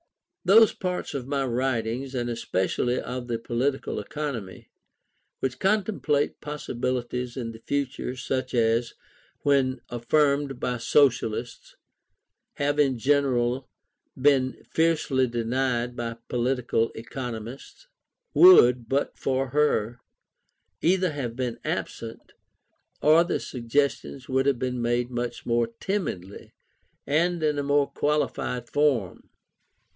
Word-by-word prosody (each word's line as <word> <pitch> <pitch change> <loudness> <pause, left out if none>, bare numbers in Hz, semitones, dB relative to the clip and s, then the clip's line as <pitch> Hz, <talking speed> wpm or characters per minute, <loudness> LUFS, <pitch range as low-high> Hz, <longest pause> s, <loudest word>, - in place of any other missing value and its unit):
Those 215 +4 +6
parts 180 -1 -3
of 130 -2 -4
my 140 -1 0
writings, 125 +1 -1
and 120 -1 -1
especially 120 +1 -1
of 125 -1 -5
the 120 -1 -1
Political 125 +4 -2
Economy, 125 -11 -6 0.7
which 130 -1 -2
contemplate 190 -8 0
possibilities 125 -4 -3
in 115 -3 -3
the 110 - -12
future 135 0 -3
such 130 0 -3
as, 115 0 +1 0.5
when 135 -3 +2
affirmed 140 +2 +1
by 125 -1 -1
Socialists, 120 -2 +1 0.8
have 145 +1 -1
in 135 -4 +3
general 130 -1 +1 0.5
been 130 -1 +2
fiercely 155 -5 +2
denied 120 +1 -1
by 115 -1 -4
political 120 -2 0
economists, 120 - -7 0.5
would, 125 - +7
but 140 +1 0
for 135 0 0
her, 125 -5 +1 0.8
either 185 0 +2
have 130 -6 -4
been 125 -2 -3
absent, 115 -1 -5 0.7
or 155 +3 +6
the 175 - -1
suggestions 135 +1 -2
would 135 +1 +1
have 140 -3 +3
been 125 0 -2
made 120 +1 0
much 120 0 -4
more 120 -1 +2
timidly 125 - -4 0.5
and 170 +3 +1
in 150 -1 +1
a - - -1
more 145 0 +3
qualified 145 -4 -1
form. 135 - 0
130 Hz, 110 wpm, -26 LUFS, 120-145 Hz, 0.8 s, would